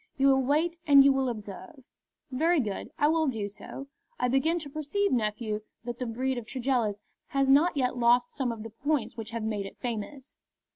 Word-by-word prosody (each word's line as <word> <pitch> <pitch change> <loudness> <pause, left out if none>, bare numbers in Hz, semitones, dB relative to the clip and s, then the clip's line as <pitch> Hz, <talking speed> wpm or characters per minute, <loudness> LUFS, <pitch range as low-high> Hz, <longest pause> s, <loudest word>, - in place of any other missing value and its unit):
You 275 0 +4
will 265 0 +4
wait 310 +6 +1
and 280 -2 +8
you 280 - +6
will 265 -1 0
observe." 210 +4 -8 0.5
"Very 320 +6 +2
good; 210 -7 -3
I 295 - +3
will 320 0 +2
do 220 -6 -2
so. 205 +6 -9 0.3
I 250 - +1
begin 300 +7 +2
to 310 -4 -5
perceive, 310 +7 -1
nephew, 215 -2 -1 0.2
that 240 0 -6
the 250 - -2
breed 255 +2 -1
of 225 - -11
Tregellis 245 -5 0 0.3
has 275 -1 +2
not 300 +3 +4
yet 255 -2 +1
lost 240 +1 +4
some 260 -4 -2
of 225 -2 -7
the 225 - -8
points 260 -1 -1
which 225 -1 -6
have 230 -1 -4
made 210 -3 -2
it - - -13
famous." 250 +3 -6
255 Hz, 200 wpm, -28 LUFS, 225-285 Hz, 0.5 s, and